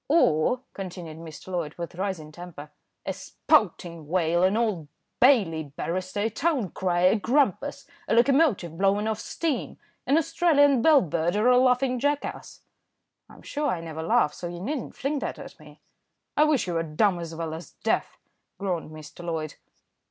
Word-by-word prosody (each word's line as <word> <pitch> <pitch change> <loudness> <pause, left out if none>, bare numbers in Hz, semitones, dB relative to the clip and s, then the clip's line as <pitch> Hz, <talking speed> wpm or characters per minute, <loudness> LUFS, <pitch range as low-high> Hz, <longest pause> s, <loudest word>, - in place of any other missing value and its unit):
"Or," 250 - +3
continued 175 -4 -7
Mr. 160 +1 -10
Loyd 170 -5 -3
with 170 -1 -6
rising 180 -4 -4
temper, 155 -3 -10 0.3
"a - - -2
spouting 175 - 0
whale, 170 0 +1
an 190 +3 +3
Old 210 -10 -1 0.3
Bailey 205 - +4
barrister, 185 +7 -4
a 220 - +1
town 275 - 0
crier, 180 0 +2
a - - +3
grampus, 260 +7 0 0.2
a - - +2
locomotive 235 - +3
blowing 200 +2 +2
off 220 -1 -1
steam, 320 -5 -3 0.3
an 280 +4 +4
Australian 305 -5 +3
bell 305 +1 +6
bird, 170 +1 -1
or 215 +4 +3
a 250 - +6
laughing 255 0 +2
jackass?" 290 +2 -2 0.7
"I'm - - -16
sure 295 0 -2
I 180 - 0
never 160 -1 -6
laugh, 150 -2 +2
so 175 - -6
you 175 0 -7
needn't 265 - -4
fling 285 +2 -2
that - - -4
at - - -11
me." - - -16 0.5
"I 300 - +5
wish 305 -4 +2
you 180 - -3
were 165 - +1
dumb 175 +4 +1
as 165 -1 -6
well 165 -1 -4
as 165 +2 -9
deaf," - - 0 0.4
groaned 180 -6 -3
Mr. 155 +2 -11
Loyd. 160 -3 -3
185 Hz, 165 wpm, -26 LUFS, 165-255 Hz, 0.7 s, bell